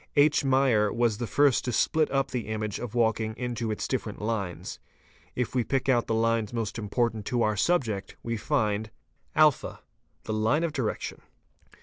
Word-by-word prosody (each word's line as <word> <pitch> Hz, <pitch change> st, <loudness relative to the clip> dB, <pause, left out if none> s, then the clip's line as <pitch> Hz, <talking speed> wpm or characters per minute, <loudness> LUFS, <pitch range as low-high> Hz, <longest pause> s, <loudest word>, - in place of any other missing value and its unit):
H. 145 Hz, 0 st, +4 dB
Mayer®", 130 Hz, -6 st, +3 dB
was 115 Hz, -3 st, +1 dB
the 120 Hz, -, -2 dB
first 145 Hz, -1 st, +3 dB
to 125 Hz, -, -1 dB
split 155 Hz, +6 st, +2 dB
up 135 Hz, 0 st, 0 dB
the 125 Hz, -4 st, -3 dB
image 110 Hz, -1 st, -3 dB
of 120 Hz, -1 st, -6 dB
walking 110 Hz, -1 st, +1 dB
into 120 Hz, -2 st, -3 dB
its 105 Hz, -, -2 dB
different 115 Hz, -5 st, -3 dB
lines. 105 Hz, -5 st, -3 dB, 0.6 s
If 125 Hz, -2 st, -2 dB
we 125 Hz, -2 st, +2 dB
pick 135 Hz, +2 st, -1 dB
out 120 Hz, -3 st, +3 dB
the 115 Hz, -, 0 dB
lines 115 Hz, -1 st, +1 dB
most 115 Hz, -1 st, -3 dB
important 110 Hz, +1 st, -1 dB
to 120 Hz, -2 st, +1 dB
our 110 Hz, 0 st, +1 dB
subject 110 Hz, -, 0 dB
_ -, -, -28 dB
we 115 Hz, 0 st, -2 dB
find 105 Hz, 0 st, 0 dB, 0.2 s
:— -, -, -40 dB
(a) 155 Hz, -2 st, +7 dB, 0.7 s
The 110 Hz, -, -3 dB
line 110 Hz, +9 st, +2 dB
of 165 Hz, -3 st, -1 dB
direction. 125 Hz, -7 st, -3 dB
115 Hz, 185 wpm, -27 LUFS, 110-130 Hz, 0.7 s, a